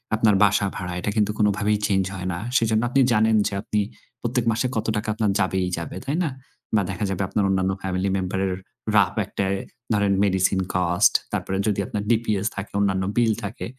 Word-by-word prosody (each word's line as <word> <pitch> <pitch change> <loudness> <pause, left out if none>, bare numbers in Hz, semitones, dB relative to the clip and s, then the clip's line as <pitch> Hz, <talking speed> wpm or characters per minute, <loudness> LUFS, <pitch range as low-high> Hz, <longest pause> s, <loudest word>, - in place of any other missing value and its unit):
আপনার 110 -2 +3
বাসা 105 0 +3
ভাড়া 90 -1 -4
এটা 105 +2 -2
কিন্তু 105 -1 +2
কোনভাবেই 105 0 +2
চেঞ্জ 95 -1 +2
হয় 90 -1 -4
না। - - -3 0.2
সেজন্য 110 -1 +2
আপনি 135 +2 +2
জানেন 110 0 +3
যে - - -4
আপনি 105 - -1 0.4
প্রত্যেক 120 0 -1
মাসে 120 +4 0
কত 110 -1 -1
টাকা 105 - -3
আপনার 110 -1 +1
যাবেই 95 -1 +1
যাবে, 85 - -5
তাই 140 +4 -1
না? 160 - 0 0.5
বা 105 - +4
দেখা 100 +3 -2
যাবে 95 0 -2
আপনার 105 +2 0
অন্যান্য 95 0 +1
ফ্যামিলি 95 +1 -1
মেম্বারের 95 0 -1 0.4
rough 100 -1 +3
একটা 100 0 -2 0.5
ধরেন 100 -2 +2
মেডিসিন 95 -1 +2 0.2
কস্ট 90 +2 +3 0.2
তারপরে 95 - -2
যদি 105 -2 +1
আপনার 105 - -3
DPS 110 -3 +1
থাকে 100 +1 -6
অন্যান্য 95 -2 +1
বিল 115 -2 +4
থাকে 100 +2 -5
100 Hz, 185 wpm, -23 LUFS, 95-110 Hz, 0.5 s, বা